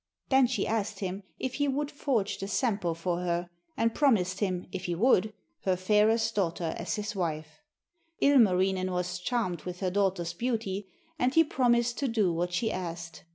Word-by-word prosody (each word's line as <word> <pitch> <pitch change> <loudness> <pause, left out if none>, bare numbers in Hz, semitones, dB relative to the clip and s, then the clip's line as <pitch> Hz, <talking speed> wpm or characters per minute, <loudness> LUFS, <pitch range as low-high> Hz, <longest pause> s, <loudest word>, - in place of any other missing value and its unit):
Then 265 -1 +5
she 250 - -1
asked 220 -2 -2
him 190 +1 -3 0.2
if 260 -1 -3
he 285 +1 0
would 285 +2 -1
forge 255 -9 -1
the 195 - -4
Sampo 200 - 0
for 170 +1 -2
her, 175 0 -2 0.3
and 230 0 +2
promised 195 -10 +2
him, 185 -4 -1
if 190 0 -5
he 175 - -1
would, 215 +1 +3 0.3
her 190 -1 +2
fairest 215 +4 +2
daughter 170 -4 -1
as 170 - -3
his 210 0 -4
wife. 160 - -3 0.6
Ilmarinen 190 -8 +4
was 180 0 -2
charmed 185 -5 -1
with 180 -1 -6
her 185 -1 -1
daughter's 190 -3 0
beauty, 220 -5 -2 0.3
and 255 +2 +1
he 325 - +7
promised 240 -4 +1
to 275 - 0
do 215 -7 +1
what 175 +2 -1
she 220 +5 0
asked. 170 -2 -6
195 Hz, 175 wpm, -29 LUFS, 180-235 Hz, 0.6 s, he